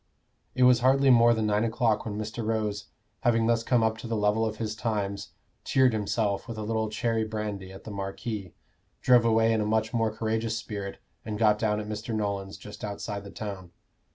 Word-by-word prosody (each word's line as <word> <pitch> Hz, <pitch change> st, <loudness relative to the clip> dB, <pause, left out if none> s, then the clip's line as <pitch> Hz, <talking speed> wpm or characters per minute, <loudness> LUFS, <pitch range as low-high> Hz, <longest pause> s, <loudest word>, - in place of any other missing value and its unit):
It 130 Hz, -, +3 dB
was 125 Hz, -2 st, +6 dB
hardly 135 Hz, +2 st, +4 dB
more 120 Hz, -1 st, +6 dB
than 110 Hz, -1 st, 0 dB
nine 105 Hz, 0 st, +2 dB
o'clock 115 Hz, -1 st, +1 dB
when 105 Hz, -2 st, -4 dB
Mr. 110 Hz, +2 st, -4 dB
Rose, 105 Hz, -2 st, -2 dB, 0.3 s
having 115 Hz, -2 st, +2 dB
thus 115 Hz, 0 st, +2 dB
come 115 Hz, 0 st, +2 dB
up 110 Hz, 0 st, 0 dB
to 115 Hz, -, -7 dB
the 115 Hz, -1 st, -1 dB
level 105 Hz, +2 st, +2 dB
of 110 Hz, 0 st, -5 dB
his 110 Hz, -1 st, -3 dB
times, 105 Hz, -4 st, -3 dB, 0.3 s
cheered 130 Hz, -3 st, +3 dB
himself 105 Hz, -1 st, -1 dB
with 115 Hz, -, -6 dB
a 110 Hz, -, -4 dB
little 110 Hz, 0 st, -1 dB
cherry 115 Hz, 0 st, 0 dB
brandy 105 Hz, -3 st, -4 dB
at 95 Hz, -, -11 dB
the 110 Hz, -, -8 dB
Marquis, 100 Hz, 0 st, -5 dB, 0.5 s
drove 125 Hz, -2 st, +6 dB
away 115 Hz, 0 st, +4 dB
in 110 Hz, -, +1 dB
a -, -, 0 dB
much 110 Hz, +1 st, 0 dB
more 115 Hz, -2 st, +2 dB
courageous 110 Hz, +1 st, -1 dB
spirit, 100 Hz, -3 st, -5 dB, 0.3 s
and 105 Hz, -1 st, -4 dB
got 105 Hz, -1 st, +3 dB
down 105 Hz, -1 st, +1 dB
at 105 Hz, -, -5 dB
Mr. 110 Hz, +1 st, -4 dB
Nolan's, 100 Hz, -2 st, -3 dB
just 105 Hz, -, -11 dB
outside 100 Hz, 0 st, -4 dB
the 100 Hz, -, -9 dB
town. 100 Hz, -4 st, -7 dB
110 Hz, 205 wpm, -27 LUFS, 105-115 Hz, 0.5 s, was